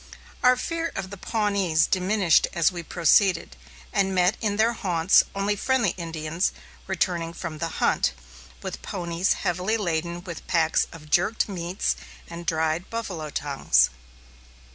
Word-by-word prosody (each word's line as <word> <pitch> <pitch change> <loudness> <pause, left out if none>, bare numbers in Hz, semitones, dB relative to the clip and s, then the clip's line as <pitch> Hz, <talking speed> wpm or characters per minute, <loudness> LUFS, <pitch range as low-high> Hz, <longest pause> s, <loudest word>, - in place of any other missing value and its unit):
Our 250 0 +6
fear 330 +5 -2
of 190 0 -4
the 200 - -7
Pawnees 200 -6 +1
diminished 190 -2 +3
as 170 0 +3
we 175 -1 -5
proceeded, 170 +2 +2 0.4
and 195 -2 +1
met 180 +2 +3
in 205 -2 0
their 225 +2 +3
haunts 180 -5 +3
only 200 +1 0
friendly 240 -2 +1
Indians 165 0 -2 0.4
returning 175 -3 -1
from 165 -3 -6
the 165 - -1
hunt, - - +2 0.5
with - - -5
ponies 170 +1 -1
heavily 180 +6 -1
laden 170 -3 -2
with 170 -3 -8
packs 165 -3 +2
of 150 -2 -13
jerked 200 +6 +2
meats 180 -1 -2 0.3
and 170 0 -9
dried 160 +2 0
buffalo 185 -9 -4
tongues. 60 - +2
180 Hz, 140 wpm, -25 LUFS, 165-200 Hz, 0.5 s, Our